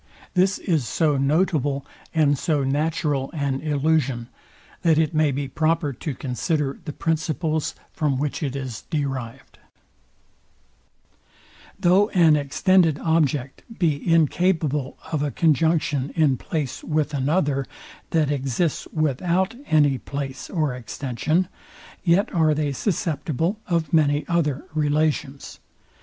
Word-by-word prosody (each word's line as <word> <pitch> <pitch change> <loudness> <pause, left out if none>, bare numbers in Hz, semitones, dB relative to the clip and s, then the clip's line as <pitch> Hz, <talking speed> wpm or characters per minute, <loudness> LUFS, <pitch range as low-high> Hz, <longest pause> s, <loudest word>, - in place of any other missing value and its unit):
This 185 +1 +3
is 155 - 0
so 150 +4 +1
notable 145 -1 +1 0.3
and 150 -3 +3
so 150 0 0
natural 145 0 0
an 140 -3 -1
illusion, 145 -5 0 0.5
that 165 -2 +3
it 160 0 +2
may 155 -1 +3
be 140 +1 -2
proper 155 +1 0
to 140 +2 -5
consider 140 +2 -2
the 150 - -4
principles, 160 0 -1 0.2
from 145 -4 0
which 145 +4 -2
it 140 -3 -2
is 130 -5 -5
derived. 135 -6 -4 2.2
Though 195 +3 +4
an 165 -4 +6
extended 160 +3 +3
object 145 -4 0 0.2
be 160 -2 0
incapable 160 -3 +1
of 155 -3 0
a 145 - 0
conjunction 155 -2 +1
in 155 -5 +3
place 140 0 -4
with 150 -1 -1
another, 140 -1 0 0.4
that 155 -4 +1
exists 140 +3 -1
without 170 - 0
any 145 -4 +3
place 140 -2 -5
or 155 -7 0
extension, 135 +8 -1 0.6
yet 180 +3 +2
are 160 -3 +3
they 145 -1 0
susceptible 160 - -1
of 170 -3 -1
many 145 -2 +3
other 150 -5 0
relations. 150 -2 -1
150 Hz, 120 wpm, -23 LUFS, 140-165 Hz, 2.2 s, an